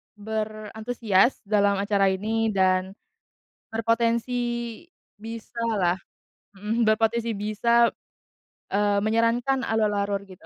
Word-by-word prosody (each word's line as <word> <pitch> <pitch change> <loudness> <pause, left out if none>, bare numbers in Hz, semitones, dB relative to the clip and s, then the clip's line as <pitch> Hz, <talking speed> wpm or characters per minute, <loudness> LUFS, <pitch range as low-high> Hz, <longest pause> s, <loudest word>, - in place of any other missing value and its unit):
berantusias 215 +1 0
dalam 205 -1 +2
acara 200 -1 +2
ini 220 +3 0
dan 185 0 +2 0.8
berpotensi 230 +2 +1 0.8
bisalah, 220 -4 -2 0.6
mhm, 215 +4 -1
berpotensi 225 +1 +1
bisa, 230 +3 +2 0.8
eee, 205 0 +2
menyarankan 230 +4 +1
alur-alur, 205 -2 0
gitu. 185 -4 -15
215 Hz, 80 wpm, -25 LUFS, 200-230 Hz, 0.8 s, dalam